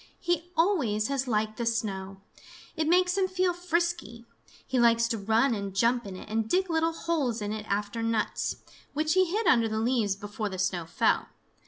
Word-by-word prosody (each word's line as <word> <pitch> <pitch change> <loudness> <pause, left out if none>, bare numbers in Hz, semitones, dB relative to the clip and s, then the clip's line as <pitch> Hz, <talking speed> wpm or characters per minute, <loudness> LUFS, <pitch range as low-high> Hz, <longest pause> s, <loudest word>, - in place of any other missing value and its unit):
He 350 0 -1
always 275 - +2
has 270 -1 -1
liked 215 -2 0
the 235 - -2
snow. 195 -4 -3 0.5
It 315 -2 0
makes 360 +1 +3
him 380 - +2
feel 370 -1 +1
frisky. 340 - -2 0.4
He 260 - 0
likes 230 -1 +4
to 230 - -1
run 225 +5 +2
and 200 -3 -4
jump 235 +2 +2
in 190 - -7
it - - -10
and 220 +1 -1
dig 370 0 +1
little 325 0 +2
holes 295 -9 -1
in 210 0 -3
it 215 -1 -6
after 205 +3 -2
nuts, 225 -2 -1 0.4
which 310 +2 +1
he 375 0 +4
hid 410 +6 -1
under 230 -8 +4
the 220 0 -2
leaves 220 -3 +1
before 205 +1 -5
the 190 - -6
snow 185 -2 -1
fell. - - +1
230 Hz, 190 wpm, -28 LUFS, 210-330 Hz, 0.5 s, likes